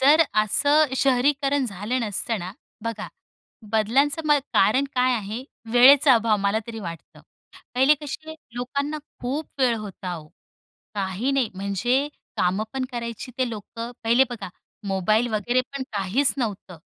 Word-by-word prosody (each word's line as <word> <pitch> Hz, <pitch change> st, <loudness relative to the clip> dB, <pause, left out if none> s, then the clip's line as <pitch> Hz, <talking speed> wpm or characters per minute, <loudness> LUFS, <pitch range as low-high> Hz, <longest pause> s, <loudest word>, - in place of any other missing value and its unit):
जर 295 Hz, +5 st, +7 dB, 0.2 s
असं 285 Hz, +6 st, +3 dB
शहरीकरण 275 Hz, +1 st, +2 dB
झालं 210 Hz, +5 st, -2 dB
नसतंना, 205 Hz, -3 st, -2 dB, 0.3 s
बघा 225 Hz, -2 st, -4 dB, 0.6 s
बदलांचं 270 Hz, +8 st, +2 dB
म 300 Hz, -, +5 dB, 0.2 s
कारण 255 Hz, +8 st, +4 dB
काय 255 Hz, 0 st, +3 dB
आहे? 220 Hz, +3 st, -4 dB, 0.3 s
वेळेचा 270 Hz, +2 st, +8 dB
अभाव, 225 Hz, -2 st, +3 dB
मला 200 Hz, +2 st, +1 dB
तरी 230 Hz, -1 st, -6 dB
वाटतं. 170 Hz, -3 st, -9 dB, 0.5 s
पहिले 265 Hz, +4 st, +5 dB
कशे 310 Hz, +2 st, -6 dB, 0.2 s
लोकांना 280 Hz, +5 st, -2 dB, 0.2 s
खूप 280 Hz, +6 st, -2 dB
वेळ 250 Hz, -3 st, +3 dB
होता 190 Hz, -4 st, -6 dB
ओ, 155 Hz, -, -11 dB, 0.7 s
काही 200 Hz, +6 st, -1 dB
नाही 265 Hz, -5 st, +1 dB
म्हणजे 235 Hz, +9 st, 0 dB, 0.3 s
काम 190 Hz, +4 st, +1 dB
पण 265 Hz, -1 st, -2 dB
करायची 235 Hz, +1 st, -5 dB
ते 255 Hz, -2 st, +1 dB
लोकं. 230 Hz, +2 st, -7 dB
पहिले 240 Hz, +4 st, +5 dB
बघा 235 Hz, -6 st, -6 dB, 0.4 s
मोबाईल 215 Hz, +5 st, +2 dB
वगैरे 240 Hz, +5 st, +1 dB
पण 275 Hz, -, -3 dB
काहीच 205 Hz, +8 st, +1 dB
नव्हतं. 200 Hz, -7 st, -4 dB
240 Hz, 135 wpm, -24 LUFS, 210-270 Hz, 0.7 s, वेळेचा